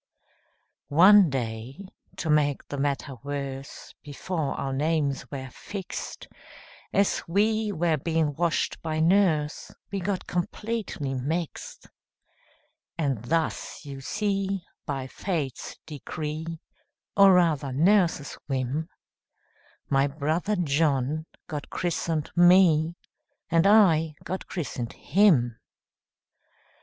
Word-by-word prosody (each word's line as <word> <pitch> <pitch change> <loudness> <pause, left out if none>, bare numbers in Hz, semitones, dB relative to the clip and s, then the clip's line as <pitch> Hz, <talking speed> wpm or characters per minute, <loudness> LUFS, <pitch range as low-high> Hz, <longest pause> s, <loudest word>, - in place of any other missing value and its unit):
One 185 +4 +7
day, 125 - -4 0.3
to 160 - -1
make 145 -2 +1
the 145 - -4
matter 140 -1 -2
worse, 140 -1 -6
Before 150 +1 -3
our 135 -1 -3
names 145 -1 0
were 130 -2 -6
fixed, 195 +5 -7 0.6
As 200 0 +2
we 215 +4 +1
were 170 -3 +1
being 160 0 0
washed 170 +2 -1
by 155 -1 -2
nurse, 165 -3 +2 0.2
We 200 - -2
got 190 +1 -2
completely 180 -5 -3
mixed; 150 +6 -4 1.1
And 135 -8 -1
thus, 160 +1 -2
you 135 -1 -7
see, 195 +2 -1 0.2
by 135 -3 -3
fate's 145 - -4
decree, 155 +1 -5 0.7
Or 195 -1 +7
rather 155 -6 +2
nurse's 165 0 +2
whim, 135 +4 -2 1.0
My 135 0 +3
brother 155 +8 -1
John 150 -2 0 0.2
got 150 -2 -6
christened 165 -3 -2
me, 175 -2 +5 0.6
And 165 +3 +4
I 165 -7 +5
got 185 - -5
christened 130 -8 -4
him. 145 - +3
155 Hz, 100 wpm, -26 LUFS, 140-180 Hz, 1.1 s, One